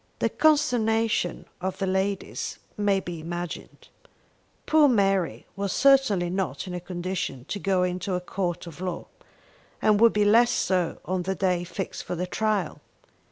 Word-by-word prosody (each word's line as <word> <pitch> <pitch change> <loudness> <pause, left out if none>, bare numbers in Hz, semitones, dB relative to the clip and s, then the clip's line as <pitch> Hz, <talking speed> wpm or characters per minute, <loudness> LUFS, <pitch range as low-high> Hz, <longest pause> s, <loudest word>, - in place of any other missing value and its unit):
The - - +1
consternation 225 - +2 0.2
of 190 +1 -3
the 195 - -1
ladies 190 +1 -2 0.2
may 205 -2 +2
be 175 -3 -6
imagined. 175 +2 -6 0.8
Poor 310 -2 +5
Mary 195 - +1
was 200 -1 -2
certainly 270 -10 +4
not 190 +1 -2
in 180 - -6
a 180 - -3
condition 175 -7 -4
to 205 - -3
go 190 -2 +1
into 180 +1 -1
a - - 0
court 180 -1 -3
of 170 0 -10
law, 180 -2 -4 0.7
and 210 -1 +3
would 230 -1 +7
be 210 0 +2
less 230 +3 +5
so 180 -3 0
on 185 +1 -1
the 190 +2 -2
day 180 -2 +1
fixed 185 +2 -5
for - - -4
the 180 +2 -2
trial. 210 -3 -1
190 Hz, 160 wpm, -26 LUFS, 180-210 Hz, 0.8 s, would